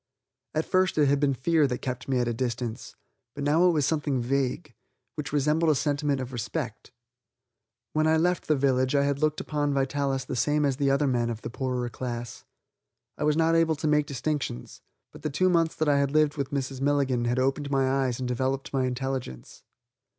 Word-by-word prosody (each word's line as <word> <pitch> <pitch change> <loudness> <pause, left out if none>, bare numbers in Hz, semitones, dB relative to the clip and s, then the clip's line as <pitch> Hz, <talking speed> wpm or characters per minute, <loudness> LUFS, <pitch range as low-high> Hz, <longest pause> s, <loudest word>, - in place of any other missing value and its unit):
At 155 - +1
first 185 -2 +1
it 150 - +5
had 140 0 +2
been 140 -2 +2
fear 155 +3 +2
that 125 -1 -4
kept 130 -1 -4
me 135 -2 +1
at 120 -1 +1
a 120 - 0
distance, 120 0 -4 0.4
but 145 - -4
now 160 +5 +4
it - - +5
was 150 -4 +1
something 145 -3 0
vague, 130 +1 -1 0.4
which 150 - -5
resembled 150 +3 +2
a - - +2
sentiment 145 0 0
of 130 0 -6
respect. 120 +1 -5 1.0
When 155 0 +2
I 160 0 +4
left 175 +2 0
the 155 - +3
village 130 -1 +1
I 140 - +4
had 140 0 0
looked 155 0 +1
upon 145 -2 -1
Vitalis 135 0 0
the - - -4
same 145 +5 +1
as 135 -2 0
the 140 -1 +1
other 140 +2 +2
men 120 -3 +1
of 115 -1 -5
the 115 - -5
poorer 125 -1 -2
class. 120 -1 -6 0.7
I - - -4
was 150 0 +2
not 165 0 +3
able 165 -1 +3
to 155 +2 -3
make 150 -1 +2
distinctions, 140 - -4 0.3
but - - -13
the 155 - -2
two 185 +7 +2
months 165 -2 +2
that 155 - -1
I 145 -1 +4
had 140 -1 +1
lived 155 0 +2
with 140 -3 -3
Mrs. 135 -1 -3
Milligan 135 -4 +1
had 120 +1 0
opened 135 +2 0
my 135 -1 +2
eyes 130 -2 0
and 130 - -3
developed 130 +3 -2
my 130 -1 +1
intelligence. 125 - -5
140 Hz, 210 wpm, -27 LUFS, 130-150 Hz, 1.0 s, it